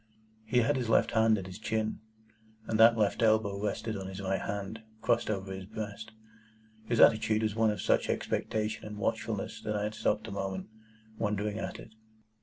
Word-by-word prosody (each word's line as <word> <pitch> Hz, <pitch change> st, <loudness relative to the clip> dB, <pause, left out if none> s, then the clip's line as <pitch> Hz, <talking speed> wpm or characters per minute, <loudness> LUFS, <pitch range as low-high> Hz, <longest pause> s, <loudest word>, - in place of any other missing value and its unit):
He 120 Hz, +3 st, +2 dB
had 140 Hz, +4 st, +2 dB
his 120 Hz, -3 st, -2 dB
left -, -, +4 dB
hand 110 Hz, -1 st, +4 dB
at 95 Hz, -, -5 dB
his 95 Hz, +2 st, -9 dB
chin, 110 Hz, 0 st, -1 dB, 0.7 s
and 110 Hz, -, -1 dB
that 115 Hz, +1 st, +8 dB
left 105 Hz, 0 st, +1 dB
elbow 110 Hz, -3 st, +2 dB
rested 110 Hz, +1 st, -2 dB
on 95 Hz, -1 st, -5 dB
his 95 Hz, 0 st, -7 dB
right 95 Hz, -1 st, -1 dB
hand, 100 Hz, +2 st, -4 dB, 0.2 s
crossed 115 Hz, +1 st, +1 dB
over 95 Hz, -2 st, -2 dB
his 95 Hz, 0 st, -7 dB
breast. 110 Hz, +1 st, -6 dB, 0.7 s
His 115 Hz, -, 0 dB
attitude 110 Hz, -1 st, +5 dB
was 110 Hz, -1 st, 0 dB
one 110 Hz, 0 st, +3 dB
of 105 Hz, -, -2 dB
such -, -, +2 dB
expectation 110 Hz, 0 st, -1 dB
and 105 Hz, 0 st, -7 dB
watchfulness 100 Hz, -, -2 dB
that 105 Hz, -, -2 dB
I 105 Hz, 0 st, 0 dB
stopped 105 Hz, 0 st, -1 dB
a -, -, -6 dB
moment, 95 Hz, -1 st, -4 dB, 0.5 s
wondering 105 Hz, 0 st, -1 dB
at -, -, -4 dB
it. 110 Hz, -, -12 dB
110 Hz, 185 wpm, -30 LUFS, 100-110 Hz, 0.7 s, that